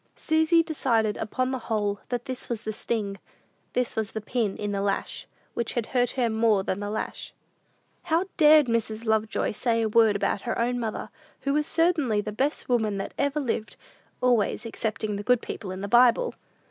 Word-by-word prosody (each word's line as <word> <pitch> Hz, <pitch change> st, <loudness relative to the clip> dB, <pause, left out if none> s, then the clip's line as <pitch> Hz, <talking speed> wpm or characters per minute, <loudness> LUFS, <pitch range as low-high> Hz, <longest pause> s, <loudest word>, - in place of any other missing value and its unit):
Susy 320 Hz, +1 st, +3 dB
decided, 230 Hz, -9 st, +1 dB
upon 255 Hz, +4 st, -1 dB
the 260 Hz, -, -2 dB
whole, 205 Hz, -3 st, -1 dB
that 245 Hz, -1 st, -2 dB
this 260 Hz, -1 st, -5 dB
was 235 Hz, -3 st, -2 dB
the 215 Hz, -, -3 dB
sting 205 Hz, -3 st, -2 dB, 0.5 s
this 250 Hz, -1 st, -1 dB
was 220 Hz, -1 st, -2 dB
the 220 Hz, -, -2 dB
"pin 215 Hz, -1 st, -1 dB
in 205 Hz, -1 st, -3 dB
the 200 Hz, -1 st, -1 dB
lash," 200 Hz, 0 st, -2 dB, 0.3 s
which 235 Hz, -, -2 dB
had 240 Hz, -3 st, -1 dB
hurt 245 Hz, -1 st, +3 dB
her 245 Hz, -2 st, +3 dB
more 220 Hz, -3 st, +2 dB
than 190 Hz, -, -2 dB
the 205 Hz, 0 st, -4 dB
lash. 215 Hz, +1 st, -5 dB, 0.7 s
How 335 Hz, +2 st, +2 dB
dared 305 Hz, -2 st, +7 dB
Mrs. 230 Hz, -1 st, -1 dB
Lovejoy 220 Hz, -1 st, +1 dB
say 230 Hz, +1 st, 0 dB
a -, -, +2 dB
word 220 Hz, -1 st, +4 dB
about 200 Hz, -, 0 dB
her 240 Hz, -, -3 dB
own 245 Hz, +1 st, 0 dB
mother, 225 Hz, -2 st, -4 dB, 0.3 s
who 275 Hz, -, 0 dB
was 300 Hz, +1 st, +1 dB
certainly 315 Hz, -10 st, +2 dB
the 205 Hz, -, -3 dB
best 275 Hz, +8 st, -1 dB
woman 220 Hz, -5 st, +1 dB
that 195 Hz, -, -5 dB
ever 285 Hz, +1 st, +1 dB
lived, 230 Hz, -5 st, -2 dB, 0.5 s
always 240 Hz, -2 st, +2 dB
excepting 215 Hz, -2 st, -3 dB
the -, -, -4 dB
good 250 Hz, +2 st, +3 dB
people 205 Hz, -, -6 dB
in 185 Hz, +1 st, -5 dB
the 200 Hz, -, -3 dB
Bible! 245 Hz, -, +4 dB
230 Hz, 190 wpm, -26 LUFS, 210-255 Hz, 0.7 s, dared